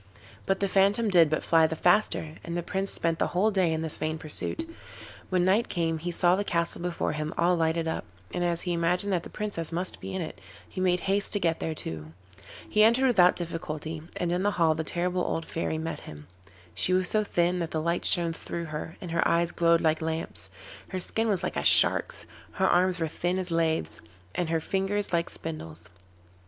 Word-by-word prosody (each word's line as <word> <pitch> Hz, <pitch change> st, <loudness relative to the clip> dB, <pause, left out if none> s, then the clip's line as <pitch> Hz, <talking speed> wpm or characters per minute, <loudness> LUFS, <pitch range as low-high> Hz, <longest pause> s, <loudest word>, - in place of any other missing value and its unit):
But 195 Hz, 0 st, +1 dB
the 200 Hz, -, +2 dB
phantom 200 Hz, +4 st, +2 dB
did 170 Hz, -5 st, +5 dB
but 155 Hz, -, -1 dB
fly 165 Hz, -1 st, +4 dB
the 160 Hz, -, -4 dB
faster, 175 Hz, -3 st, +2 dB
and 170 Hz, 0 st, -4 dB
the 175 Hz, -, -2 dB
Prince 195 Hz, +2 st, -2 dB
spent 165 Hz, -1 st, -1 dB
the -, -, +2 dB
whole 215 Hz, +4 st, +3 dB
day 185 Hz, -4 st, +2 dB
in 160 Hz, 0 st, -1 dB
this 160 Hz, -, -2 dB
vain 155 Hz, 0 st, -2 dB
pursuit. 160 Hz, -, -3 dB, 0.6 s
When 180 Hz, -1 st, +2 dB
night 205 Hz, +5 st, +2 dB
came 165 Hz, -2 st, -1 dB
he 175 Hz, +3 st, -4 dB
saw 175 Hz, +1 st, +3 dB
the 200 Hz, -, -1 dB
castle 170 Hz, -4 st, -2 dB
before 175 Hz, -1 st, -2 dB
him 155 Hz, +1 st, -4 dB
all 175 Hz, +2 st, +3 dB
lighted 165 Hz, 0 st, 0 dB
up, 160 Hz, -, -2 dB, 0.3 s
and 175 Hz, -, -1 dB
as 170 Hz, -1 st, 0 dB
he 180 Hz, -, -1 dB
imagined 180 Hz, +4 st, +1 dB
that 175 Hz, -, +1 dB
the -, -, -11 dB
Princess 200 Hz, -7 st, -3 dB
must 180 Hz, +2 st, -3 dB
be -, -, -6 dB
in -, -, -2 dB
it, 155 Hz, -, -9 dB, 0.3 s
he 185 Hz, -, -6 dB
made 180 Hz, -1 st, +2 dB
haste 195 Hz, +1 st, 0 dB
to 205 Hz, -, 0 dB
get 165 Hz, -3 st, 0 dB
there 160 Hz, -, -3 dB
too. 80 Hz, -, -6 dB, 0.5 s
He 215 Hz, -, +2 dB
entered 235 Hz, +4 st, +5 dB
without 185 Hz, -8 st, +5 dB
difficulty, 160 Hz, -2 st, -5 dB, 0.2 s
and 175 Hz, -1 st, -1 dB
in 175 Hz, +1 st, 0 dB
the 205 Hz, -, +2 dB
hall 165 Hz, -2 st, +4 dB
the 160 Hz, 0 st, -3 dB
terrible 180 Hz, +3 st, -1 dB
old 165 Hz, -2 st, -2 dB
Fairy 160 Hz, -1 st, -3 dB
met 160 Hz, +1 st, -4 dB
him. 75 Hz, -1 st, -11 dB, 0.5 s
She 185 Hz, -, +2 dB
was 185 Hz, 0 st, +3 dB
so 215 Hz, +2 st, +2 dB
thin 175 Hz, -2 st, 0 dB
that 165 Hz, -2 st, -2 dB
the 160 Hz, -, -2 dB
light 170 Hz, +2 st, -1 dB
shone 170 Hz, -1 st, +3 dB
through 170 Hz, +1 st, -6 dB
her, 150 Hz, +2 st, -6 dB
and 180 Hz, -4 st, -6 dB
her 170 Hz, -, +2 dB
eyes 170 Hz, 0 st, +2 dB
glowed 170 Hz, -1 st, +3 dB
like 160 Hz, 0 st, +1 dB
lamps; 160 Hz, -, -3 dB, 0.4 s
her 185 Hz, -, -4 dB
skin 225 Hz, +5 st, 0 dB
was 200 Hz, -4 st, 0 dB
like -, -, -2 dB
a -, -, -1 dB
shark's, -, -, +3 dB, 0.3 s
her 190 Hz, -1 st, +1 dB
arms 180 Hz, 0 st, +3 dB
were 165 Hz, -, 0 dB
thin 175 Hz, +3 st, -2 dB
as 185 Hz, -2 st, +5 dB
laths, 160 Hz, -, 0 dB, 0.3 s
and 175 Hz, -2 st, -2 dB
her 165 Hz, 0 st, +1 dB
fingers 195 Hz, +4 st, -2 dB
like 170 Hz, 0 st, +1 dB
spindles. 90 Hz, -, -7 dB
170 Hz, 220 wpm, -27 LUFS, 160-185 Hz, 0.6 s, did